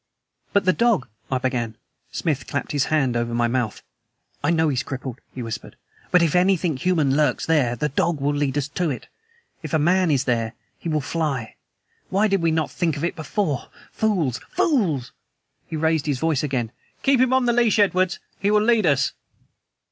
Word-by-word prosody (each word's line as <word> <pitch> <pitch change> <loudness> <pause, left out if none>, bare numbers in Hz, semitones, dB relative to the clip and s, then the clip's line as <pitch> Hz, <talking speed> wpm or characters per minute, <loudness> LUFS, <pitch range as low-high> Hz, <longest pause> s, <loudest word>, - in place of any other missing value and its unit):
"But 200 -1 +2
the 185 - +4
dog 230 - +2
" 110 - -28
I 130 - +2
began. 125 -3 -2 0.3
Smith 140 -5 -2
clapped 140 - -3
his 145 -2 +1
hand 135 -6 +1
over 120 0 -1
my 120 0 +2
mouth. 120 -3 -2 0.6
"I 145 - +2
know 160 -2 +3
he's 130 -3 0
crippled," 130 -3 -6
he 125 - -4
whispered. 115 -1 -6 0.3
"But 180 -1 +5
if 165 -1 +1
anything 180 -3 +3
human 155 -3 +1
lurks 150 0 +1
there, 140 -7 +2
the 135 +6 -1
dog 155 +3 0
will 145 +1 +1
lead 145 -1 0
us 145 -1 0
to 175 +2 -1
it. 130 - -5 0.5
If 155 -2 -3
a - - +5
MAN 175 +4 +3
is 140 -4 +2
there, 115 -3 0 0.3
he 170 - -4
will 155 -1 +1
fly! 140 -6 -2 0.5
Why 200 +3 +3
did 195 -3 +1
we 165 - +2
not 160 -1 0
think 165 -5 -1
of 145 - -5
it 170 - -1
before. 160 -3 -2 0.2
Fools, 180 - 0
fools!" 170 - +1 0.6
He - - -5
raised 160 -1 +1
his 145 -3 +1
voice 155 0 +1
again. 130 -6 -2 0.3
"Keep 270 -2 +4
him 255 -1 +3
on 260 -1 +3
leash, 240 -2 +3
Edwards. 185 -3 +2 0.2
He 200 - +1
will 210 0 +4
lead 220 -4 +3
us." 135 -2 +2
155 Hz, 195 wpm, -23 LUFS, 130-180 Hz, 0.6 s, But